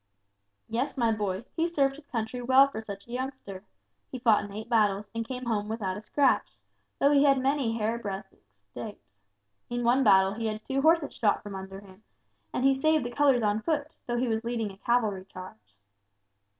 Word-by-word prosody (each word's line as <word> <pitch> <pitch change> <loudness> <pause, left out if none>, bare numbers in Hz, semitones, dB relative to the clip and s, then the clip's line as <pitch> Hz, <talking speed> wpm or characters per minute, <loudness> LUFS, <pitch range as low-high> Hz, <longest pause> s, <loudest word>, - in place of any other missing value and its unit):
"Yes, 240 +6 -2
my 235 -3 +2
boy, 205 -1 -2
he 330 0 +1
served 275 -5 +1
his 290 0 -15
country 235 0 -3
well 260 +3 +6
for 220 -5 -6
such 200 -2 -8
a - - -12
youngster, 250 -7 -5 0.5
he 260 - -4
fought 230 -4 +3
in 205 - -8
eight 215 +2 -7
battles, 210 -3 +1
and 230 0 -3
came 255 0 -5
home 210 -3 -1
without 205 -4 -2
a 210 - -7
scratch, 275 +4 +1 0.4
though 280 - +4
he 285 -1 +5
had 275 -2 +5
many 265 -4 0
hair 225 +2 -1
breadth 195 -2 -6 0.3
escapes. 105 - -10 0.6
In 240 0 -2
one 245 +3 +3
battle 190 -3 +5
he 225 +1 -3
had 215 0 -5
two 270 0 -1
horses 320 0 +3
shot 210 -3 +1
under 195 -1 -7
him, 190 0 -16 0.5
and 255 - -1
he 270 - +6
saved 310 0 +2
the 240 - -4
colors 265 -2 +3
on 210 +1 +1
foot, 305 +2 -1 0.2
though 240 0 -1
he 250 +1 0
was 225 -1 -1
leading 230 -3 -2
a 190 - -14
cavalry 215 -4 0
charge." 145 - -12
230 Hz, 195 wpm, -28 LUFS, 205-265 Hz, 0.6 s, well